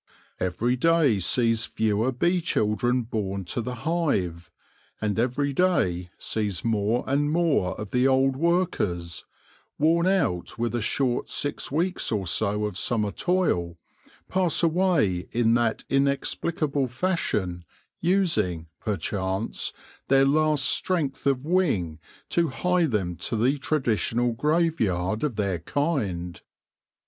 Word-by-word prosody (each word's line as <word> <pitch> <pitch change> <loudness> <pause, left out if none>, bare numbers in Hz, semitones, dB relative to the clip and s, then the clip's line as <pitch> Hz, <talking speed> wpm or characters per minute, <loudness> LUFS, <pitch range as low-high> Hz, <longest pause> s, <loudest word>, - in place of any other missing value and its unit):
Every 105 +8 0
day 150 -5 +3
sees 115 +4 +2
fewer 110 +3 0
bee 175 +8 +1
children 120 -3 +1
born 100 -4 -3
to 120 - -2
the 125 +2 -4
hive, 100 - -1 0.5
and 105 0 -1
every 135 +4 0
day 95 - +1
sees 105 -5 -2
more 110 +1 +1
and 145 +2 +1
more 155 - +1
of 105 -2 -6
the 125 +1 +3
old 135 0 +3
workers 130 - -1 0.3
— - - -34
worn 165 +4 +3
out 170 - 0
with 120 -1 -1
a 120 - -1
short 125 +2 0
six 145 -1 -2
weeks 175 +5 0
or 105 -4 -1
so 105 +4 +1
of 105 -2 -3
summer 105 -4 0
toil 90 - 0 0.2
— 80 +2 -29
pass 180 -3 +1
away 165 - +2
in 115 -1 +3
that 120 -1 +1
inexplicable 140 +1 0
fashion, 115 - -1 0.4
using, 155 - +1
perchance, 100 -1 -2 0.4
their 135 0 +5
last 150 0 +2
strength 145 -7 0
of 135 0 +1
wing 135 - 0 0.3
to 170 -1 +2
hie 180 +6 +1
them 95 - -1
to - - -2
the 130 +6 +1
traditional 120 -4 0
grave 160 +5 +1
yard 95 +2 0
of 145 -7 -1
their 100 -4 -1
kind. 95 - -2
120 Hz, 130 wpm, -25 LUFS, 100-155 Hz, 0.5 s, their